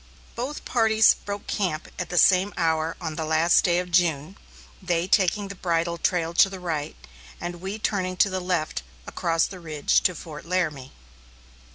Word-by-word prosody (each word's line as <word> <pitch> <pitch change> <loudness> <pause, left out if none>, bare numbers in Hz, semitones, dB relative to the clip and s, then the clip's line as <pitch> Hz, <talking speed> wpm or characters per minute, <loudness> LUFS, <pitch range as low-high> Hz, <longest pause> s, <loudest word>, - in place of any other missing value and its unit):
Both 260 +5 -5
parties 220 -2 +4
broke 200 0 -7
camp 175 -6 -2
at 180 - -3
the 175 - -3
same 190 +3 +4
hour 160 0 0
on 160 -3 -5
the 160 - -2
last 160 +2 +3
day 175 -1 +2
of 180 0 -3
June, 170 -1 +1 0.5
they 175 -2 0
taking 200 +1 +2
the 200 - -7
bridle 170 -2 -1
trail 170 -2 0
to 195 - +5
the 195 -1 -8
right, 160 -5 -3 0.4
and 175 0 -6
we 195 +3 -4
turning 185 -4 -2
to 200 - +4
the 185 - -1
left 180 - -1 0.2
across 165 -1 0
the 190 - -8
ridge 155 -4 +1
to 180 - +1
Fort 155 -1 -9
Laramie. 155 -7 -2
175 Hz, 175 wpm, -25 LUFS, 165-190 Hz, 0.5 s, to